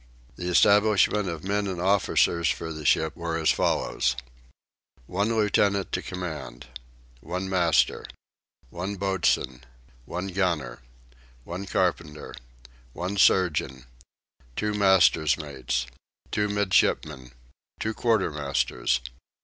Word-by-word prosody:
The 90 0 -4
establishment 105 +1 +4
of 80 -2 -6
men 100 +1 -1
and 95 -2 -4
officers 90 -3 +2
for 80 -1 -3
the 75 -1 -8
ship 80 -2 +2
were 85 -1 -3
as 80 -1 +3
follows: 65 -1 0 0.9
1 100 - -1
Lieutenant 100 -3 +1
to - - -1
command. 80 -11 -7 0.5
1 90 +7 -4
Master. 90 -5 +1 0.6
1 95 +4 -4
Boatswain. 95 -9 0 0.4
1 90 +6 -4
Gunner. 85 -10 -1 0.6
1 90 +8 -6
Carpenter. 75 -4 -2 0.6
1 90 +3 -4
Surgeon. 75 -10 +2 0.7
2 105 0 -1
Master's 95 -7 +4
Mates. 65 -5 -3 0.5
2 105 0 0
Midshipmen. 75 -10 0 0.5
2 110 - -2
Quartermasters. 75 - 0
90 Hz, 100 wpm, -26 LUFS, 75-100 Hz, 0.9 s, establishment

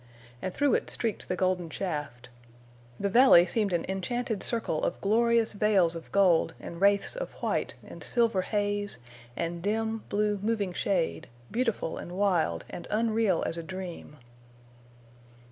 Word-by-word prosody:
And 185 - -3
through 285 +7 +2
it - - 0
streaked 225 -3 -2
the 185 - -1
golden 185 -2 0
shaft. 145 -10 -4 0.7
The 200 - 0
valley 205 -5 +7
seemed 205 +2 0
an 175 - 0
enchanted 215 +3 -2
circle 225 -9 0
of - - -1
glorious 230 +2 +2
veils 205 -5 +3
of 165 -1 -9
gold 185 -5 +3
and 170 +1 -8
wraiths 200 - +3
of - - -5
white - - -2
and - - -9
silver 230 -5 +2
haze 205 - -1 0.4
and 170 0 -3
dim, 220 +3 -1
blue, 210 0 0
moving 205 -4 -1
shade—beautiful 165 - -2
and 175 - -8
wild 180 - +1
and 175 - -8
unreal 220 -4 +1
as 170 - -2
a - - -3
dream. 180 -4 -7
200 Hz, 145 wpm, -28 LUFS, 175-220 Hz, 0.7 s, valley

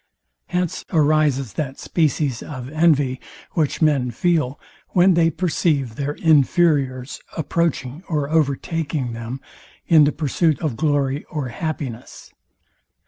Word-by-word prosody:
Hence 180 -2 -2
arises 150 - +2
that 135 -3 -4
species 150 -6 0
of 130 -4 -7
envy, 145 -5 +2 0.3
which 155 -1 0
men 140 -5 +2
feel, 150 +1 0 0.3
when 185 +1 +5
they 165 -1 +4
perceive 155 -7 0
their 140 +4 -3
inferiors 145 -4 +2 0.2
approaching 155 -3 -1
or 150 -4 0
overtaking 150 -3 -1
them 115 +3 -6 0.4
in 155 -3 +6
the 145 - +2
pursuits 155 +1 0
of 150 -8 -1
glory 145 -1 0
or 145 -5 -4
happiness. 135 -4 -6
150 Hz, 115 wpm, -21 LUFS, 135-160 Hz, 0.4 s, in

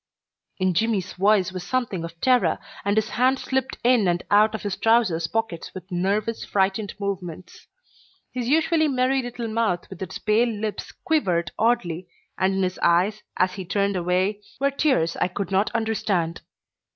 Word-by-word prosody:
In 185 -1 +1
Jimmy's 195 -1 0
voice 195 -1 +3
was 185 -1 -6
something 220 -5 -2
of 165 0 -8
terror, 255 -2 +3 0.3
and 200 +1 +1
his 220 0 +2
hands 260 +3 +1
slipped 265 -1 -1
in 240 -5 +4
and 175 0 +1
out 215 +2 +5
of - - -6
his 200 -2 -2
trousers' 195 -6 +2
pockets 225 -7 -3
with 185 +1 -9
nervous, 200 +5 -1
frightened 195 +1 0
movements. 185 -3 -6 0.6
His 245 -2 -3
usually 315 +1 +3
merry 265 -1 +1
little 245 -1 -5
mouth 220 -5 0
with - - -10
its 185 - -5
pale 225 +3 +2
lips 215 -1 -4
quivered 180 - 0
oddly, 185 -7 +1 0.3
and 190 +1 +1
in 195 - +1
his 185 0 -2
eyes, 185 +5 +2 0.2
as 185 0 +2
he 190 - -5
turned 200 +2 0
away, 185 +3 0 0.2
were 280 +1 +2
tears 265 - +1
I - - +2
could 190 +1 -4
not 195 +2 +2
understand. 205 -7 -1
205 Hz, 165 wpm, -24 LUFS, 185-230 Hz, 0.6 s, out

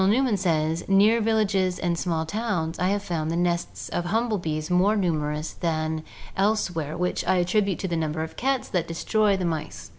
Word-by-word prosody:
Newman 240 +2 +3
says, 165 -3 0
'Near 210 +4 +5
villages 205 -4 +1
and 175 -1 0
small 165 -2 -1
towns 175 -4 -2
I 180 - +2
have 200 +1 0
found 160 -3 -2
the 165 - -1
nests 175 0 -1
of 175 - -2
humble 220 +2 0
bees 155 -1 -3
more 190 +4 +4
numerous 155 -4 -1
than 160 -2 -1 0.3
else 205 -1 +1
where, 155 -1 -3
which 180 +1 -1
I - - +4
attribute 185 +2 +1
to 190 - -2
the 170 - -1
number 160 0 -1
of 160 - -7
cats 270 0 0
that 175 -2 -1
destroy 205 +4 +1
the 185 - -2
mice.' 160 -3 -4
180 Hz, 190 wpm, -25 LUFS, 160-205 Hz, 0.3 s, Near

